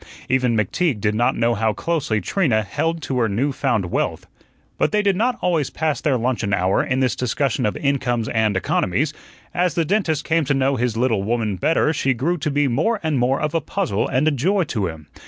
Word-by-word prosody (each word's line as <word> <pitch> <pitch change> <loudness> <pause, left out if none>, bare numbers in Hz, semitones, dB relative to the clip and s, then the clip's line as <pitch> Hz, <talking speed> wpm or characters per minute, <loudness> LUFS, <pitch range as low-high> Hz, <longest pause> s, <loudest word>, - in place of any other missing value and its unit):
Even 125 -3 +1
McTeague 115 - 0
did 105 0 0
not 120 +3 +1
know 115 0 +2
how 110 0 0
closely 140 -3 -1
Trina 115 - +1
held 160 +8 -2
to 130 -1 -1
her 115 -2 +2
new 125 +9 0
found 115 -10 -1
wealth. - - -1 0.5
But - - +2
they 210 0 +2
did 200 -2 +2
not 240 +5 +1
always 165 -6 +1
pass 155 -2 -2
their 145 -5 +1
luncheon 115 -4 0
hour 95 +1 +1
in 130 +1 -1
this 130 -2 +1
discussion 125 -2 0
of 105 - -3
incomes 125 -5 0
and 110 -3 +1
economies. 125 - 0 0.4
As 180 -3 0
the 165 - +1
dentist 165 -5 0
came 165 0 +2
to 140 +1 +1
know 135 +1 +1
his 120 -2 -1
little 115 -4 +1
woman 110 -1 -1
better 155 - +1
she 135 -3 0
grew 165 +9 -1
to 150 +1 -1
be 145 0 +1
more 160 - +1
and 155 -4 0
more 125 +2 +1
of 150 -1 -2
a 165 - +1
puzzle 155 - -1
and 135 +5 +1
a - - +4
joy 180 +9 +1
to 110 - -2
him. 80 -2 -8
130 Hz, 215 wpm, -21 LUFS, 110-160 Hz, 0.5 s, a